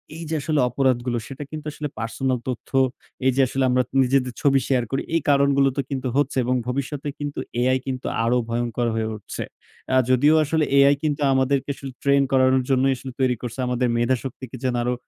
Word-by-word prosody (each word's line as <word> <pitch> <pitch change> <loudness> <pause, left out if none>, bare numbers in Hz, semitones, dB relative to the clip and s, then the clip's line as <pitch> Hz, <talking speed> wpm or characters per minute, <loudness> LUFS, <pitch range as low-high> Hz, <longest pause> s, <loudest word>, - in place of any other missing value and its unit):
এই 165 - -7
যে 160 - -1
আসলে 155 0 0
অপরাধগুলো 125 -1 0
সেটা 135 +1 -7
কিন্তু 155 -1 -7
আসলে 150 0 -5
পার্সোনাল 125 +2 -1
তথ্য, 125 -3 -5 0.6
এই 130 - +5
যে 135 - +4
আসলে 135 +2 -1
আমরা 125 0 +3 0.2
নিজেদের 125 -1 +1
ছবি 135 -1 +4
শেয়ার 130 -3 +2
করি। 135 - 0
এই 165 - +2
কারণগুলো 140 -1 +4
তো - - +2
কিন্তু 130 -2 -3
হচ্ছে 145 -1 +1
এবং 125 +1 +1
ভবিষ্যতে 140 +3 -3
কিন্তু 145 -1 -4 0.2
AI 130 +1 +3
কিন্তু 130 -1 -3 0.2
আরো 120 +2 +2
ভয়ংকর 120 0 -1
হয়ে 110 -1 -1
উঠছে। 105 - -6 0.5
আ - - +4
যদিও 145 +5 +5
আসলে 155 +1 +1
AI 140 +1 +6
কিন্তু 150 -1 0
আসলে 135 - +3
আমাদেরকে 135 +1 +1 0.3
ট্রেন 140 0 +4
করানোর 130 0 +4
জন্যই 135 0 +3
আসলে 130 +1 -8
তৈরি 130 -2 +2
করছে। 125 +1 -6
আমাদের 125 0 0
মেধা 120 +2 +2
শক্তিকে 130 -1 -7
যেন 130 -1 0
আরো 125 +1 0
130 Hz, 195 wpm, -23 LUFS, 125-140 Hz, 0.6 s, AI